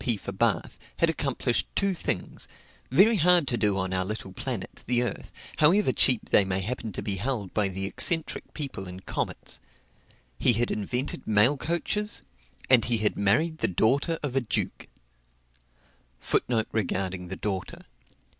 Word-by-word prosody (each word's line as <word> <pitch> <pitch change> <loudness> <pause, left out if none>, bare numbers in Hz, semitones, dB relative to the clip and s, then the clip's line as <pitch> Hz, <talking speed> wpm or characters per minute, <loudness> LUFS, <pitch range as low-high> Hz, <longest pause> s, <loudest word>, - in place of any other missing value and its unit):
P. 120 -4 +1
for - - -6
Bath, - - 0 0.2
had 165 -1 +3
accomplished 135 -6 -1
two 195 -1 +2
things, 175 - -2 0.4
very 205 - +5
hard 175 -3 +5
to 120 - 0
do 105 -3 +1
on 95 -1 -2
our 95 0 +1
little 95 -1 -5
planet, - - -5
the 120 0 +2
Earth, 120 - -5 0.3
however 170 +1 +4
cheap 125 -3 +2
they 100 - +7
may 95 -1 -1
happen 115 +2 -4
to - - -5
be 100 -2 -2
held 105 -2 -3
by 105 -2 +2
the 95 0 -3
eccentric 160 - +1
people 135 - -5
in 90 +1 -8
comets: - - -4 0.8
he 125 - +5
had 120 +2 0
invented 125 +6 -3
mail 110 +6 +5
coaches, 175 +8 -2 0.4
and 125 -3 +5
he 120 -1 +4
had 110 -1 0
married 155 +12 +1
the - - +2
daughter 140 - +1
of 135 -3 -3
a 135 - +3
duke. 120 - -2
120 Hz, 145 wpm, -27 LUFS, 100-155 Hz, 0.8 s, they